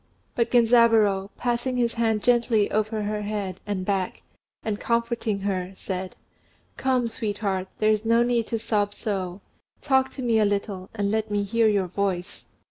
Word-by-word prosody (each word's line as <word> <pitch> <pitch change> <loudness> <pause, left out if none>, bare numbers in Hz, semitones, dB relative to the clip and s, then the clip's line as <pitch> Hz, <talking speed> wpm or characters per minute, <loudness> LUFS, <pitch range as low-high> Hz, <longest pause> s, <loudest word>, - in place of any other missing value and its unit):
But 235 - +1
Genzaburô, 225 -5 +4
passing 245 +1 -1
his 235 -1 +1
hand 225 -2 0
gently 235 -3 +3
over 215 0 0
her 210 0 -2
head 205 -3 -3
and 195 -3 -2
back, 195 -2 -2 0.4
and 210 -2 -2
comforting 235 -3 -1
her, 190 -2 -2
said, 185 -1 -5 0.6
"Come, 255 -2 +1
sweetheart, 205 -4 -2
there 215 0 +3
is 215 0 +1
no 230 +1 +4
need 240 -2 +1
to 230 - -1
sob 205 -2 0
so. 190 -3 -3 0.4
Talk 265 -2 +2
to 260 - -6
me 230 -2 +3
a - - +4
little, 200 -2 -2
and 200 -2 0
let 220 0 0
me 205 -1 0
hear 225 +3 +2
your 200 -3 +2
voice." 185 0 -3
215 Hz, 165 wpm, -25 LUFS, 200-235 Hz, 0.6 s, Genzaburô